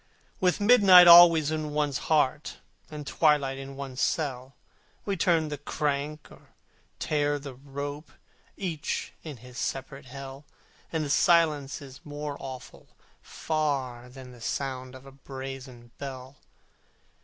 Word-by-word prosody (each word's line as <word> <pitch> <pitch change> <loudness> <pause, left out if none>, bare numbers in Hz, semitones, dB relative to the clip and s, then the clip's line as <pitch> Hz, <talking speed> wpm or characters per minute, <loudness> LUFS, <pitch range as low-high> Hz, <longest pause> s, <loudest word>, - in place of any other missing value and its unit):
With 180 +1 +1
midnight 200 -5 +8
always 170 -3 +8
in 155 -1 -3
one's 145 -3 0
heart, 150 -2 +1 0.3
And 150 -1 -8
twilight 140 -3 +1
in 135 0 -8
one's 135 -2 -6
cell, 130 -3 -2 0.5
We 200 - -1
turn 165 -3 +1
the 145 - -5
crank, 150 0 -3
or - - -19 0.4
tear 145 -1 0
the 140 -1 -8
rope, 145 +3 -7 0.5
Each 170 -7 -4
in 150 -5 -8
his 125 0 -9
separate 135 +1 -5
Hell, 135 +2 -9 0.5
And 160 -2 -1
the - - -5
silence 155 -5 +2
is 135 -1 -13
more 145 -1 -6
awful 130 -2 -10 0.3
far 135 -6 -3
Than 130 0 -12
the 120 -1 -15
sound 130 +1 -4
of 130 +1 -13
a 135 - -12
brazen 130 -3 -9
bell. 130 -1 -8
140 Hz, 130 wpm, -27 LUFS, 135-155 Hz, 0.5 s, midnight